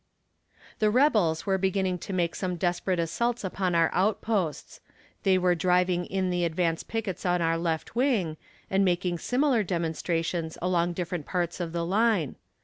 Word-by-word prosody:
The 215 - +3
rebels 210 - +3
were 190 -2 +1
beginning 190 -1 0
to 195 - -7
make 175 -3 0
some 180 -2 -2
desperate 175 +1 0
assaults 230 +9 -1
upon 185 -2 -1
our 165 -1 +3
outposts; 195 - -1 0.4
they 190 -1 +3
were 180 -1 +3
driving 180 0 +1
in 190 -1 -1
the 175 0 0
advance 165 0 0
pickets 225 -4 -4
on 180 -1 +2
our 165 -1 +1
left 165 +3 -2
wing, 225 - +1 0.3
and 195 +1 +2
making 175 -1 0
similar 255 - +2
demonstrations 165 -2 -2
along 175 -1 +1
different 175 -3 -4
parts 175 -2 -2
of 170 -2 -3
the 170 0 -2
line. 200 - +1
180 Hz, 155 wpm, -27 LUFS, 170-195 Hz, 0.4 s, The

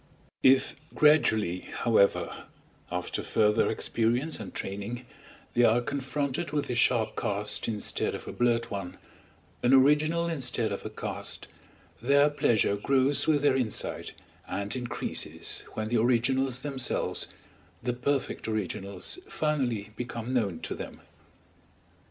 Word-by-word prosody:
If 130 0 +4 0.2
gradually, 110 - +4
however, 110 0 +1 0.5
after - - -2
further 105 0 +2
experience 120 +7 0
and - - -7
training, 100 +6 -4 0.5
they 120 - +3
are 120 0 +5
confronted 140 +4 -2
with 145 -3 -2
a - - 0
sharp 115 -2 +2
cast 105 -2 -1
instead 105 -3 0
of - - -9
a - - -5
blurred 120 -1 +1
one, 100 -3 -5 0.6
an 125 +2 +5
original 150 +5 +4
instead 125 -8 0
of 100 - -4
a - - -4
cast, 110 - -5 0.5
their 140 +4 +4
pleasure 110 -7 +2
grows 135 +5 +3
with 150 -2 +3
their 145 - +4
insight, 125 -5 -1 0.3
and 100 +3 -3
increases 125 -2 -2
when 110 0 -3
the 120 - +2
originals 125 +2 +2
themselves, 135 -3 -1 0.6
the 125 0 0
perfect 135 +1 -1
originals, 100 - -2
finally 125 -9 -1
become 120 0 -4
known 100 -9 0
to - - -3
them. - - -8
120 Hz, 125 wpm, -28 LUFS, 110-140 Hz, 0.6 s, are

